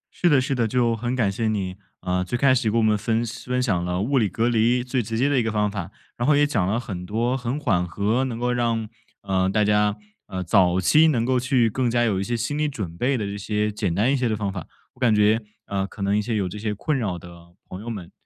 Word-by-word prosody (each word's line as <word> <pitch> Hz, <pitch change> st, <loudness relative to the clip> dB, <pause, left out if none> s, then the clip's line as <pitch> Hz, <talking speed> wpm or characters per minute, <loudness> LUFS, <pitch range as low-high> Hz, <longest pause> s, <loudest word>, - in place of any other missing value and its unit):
是 175 Hz, -, +2 dB
的 145 Hz, -4 st, +5 dB
是 130 Hz, +1 st, -1 dB
的， 120 Hz, -3 st, +1 dB
就 115 Hz, 0 st, +1 dB
很 120 Hz, +3 st, -2 dB
感 105 Hz, -6 st, +1 dB
谢 110 Hz, +3 st, -2 dB
你， 95 Hz, -4 st, -2 dB, 0.3 s
啊， 90 Hz, 0 st, -1 dB
最 120 Hz, +7 st, -2 dB
开 135 Hz, +1 st, +4 dB
始 120 Hz, -4 st, +1 dB
给 115 Hz, -, 0 dB
我 115 Hz, -, +3 dB
们 110 Hz, -1 st, +3 dB
分 115 Hz, +2 st, 0 dB
享 115 Hz, +1 st, -8 dB
分 125 Hz, 0 st, +1 dB
享 90 Hz, -8 st, 0 dB
了 90 Hz, +1 st, -2 dB
物 130 Hz, +6 st, +1 dB
理 105 Hz, -, +1 dB
隔 115 Hz, +5 st, 0 dB
离 120 Hz, +1 st, +2 dB
最 125 Hz, 0 st, -1 dB
直 115 Hz, 0 st, -4 dB
接 130 Hz, +4 st, +2 dB
的 145 Hz, -2 st, +2 dB
一 -, -, +1 dB
个 110 Hz, -, -1 dB
方 105 Hz, -1 st, +1 dB
法， 95 Hz, -4 st, -5 dB, 0.3 s
然 120 Hz, -, -2 dB
后 150 Hz, -, +5 dB
也 145 Hz, 0 st, +4 dB
讲 105 Hz, -11 st, 0 dB
了 110 Hz, +4 st, 0 dB
很 95 Hz, -8 st, -6 dB
多 115 Hz, +7 st, -1 dB
很 130 Hz, +3 st, -3 dB
缓 90 Hz, -10 st, +1 dB
和 105 Hz, +8 st, 0 dB
能 120 Hz, -3 st, -4 dB
够 125 Hz, 0 st, 0 dB
让， 115 Hz, -2 st, 0 dB, 0.4 s
呃， 95 Hz, -1 st, +1 dB
大 105 Hz, +2 st, +2 dB
家， 105 Hz, 0 st, +2 dB, 0.3 s
呃， 95 Hz, 0 st, -4 dB
早 90 Hz, 0 st, +3 dB
期 155 Hz, -, +5 dB
能 120 Hz, -7 st, +1 dB
够 130 Hz, 0 st, +2 dB
去 125 Hz, -2 st, +2 dB
更 125 Hz, +3 st, 0 dB
加 120 Hz, 0 st, +2 dB
有 105 Hz, -5 st, +1 dB
一 -, -, -1 dB
些 120 Hz, +2 st, -2 dB
心 125 Hz, +5 st, -2 dB
理 150 Hz, -, +1 dB
准 95 Hz, -, -6 dB
备 130 Hz, +8 st, 0 dB
的 105 Hz, -, -2 dB
这 100 Hz, 0 st, -4 dB
些 105 Hz, +1 st, -1 dB
简 100 Hz, -4 st, -2 dB
单 115 Hz, +7 st, +2 dB
一 -, -, +3 dB
些 125 Hz, -3 st, 0 dB
的 110 Hz, -, 0 dB
方 100 Hz, -2 st, -3 dB
法。 90 Hz, -5 st, -6 dB, 0.3 s
我 -, -, -25 dB
感 120 Hz, -4 st, +3 dB
觉， 105 Hz, +2 st, +3 dB, 0.2 s
呃， 100 Hz, 0 st, -2 dB
可 100 Hz, -, -8 dB
能 100 Hz, +1 st, +1 dB
一 105 Hz, -, +2 dB
些 110 Hz, +1 st, -2 dB
有 100 Hz, -3 st, 0 dB
这 105 Hz, +4 st, -7 dB
些 105 Hz, -1 st, -2 dB
困 150 Hz, +8 st, -1 dB
扰 105 Hz, -9 st, -2 dB
的 85 Hz, 0 st, -13 dB, 0.2 s
朋 95 Hz, +2 st, -8 dB
友 120 Hz, -, -6 dB
们， 100 Hz, -7 st, -7 dB
110 Hz, 300 characters per minute, -23 LUFS, 100-125 Hz, 0.4 s, 的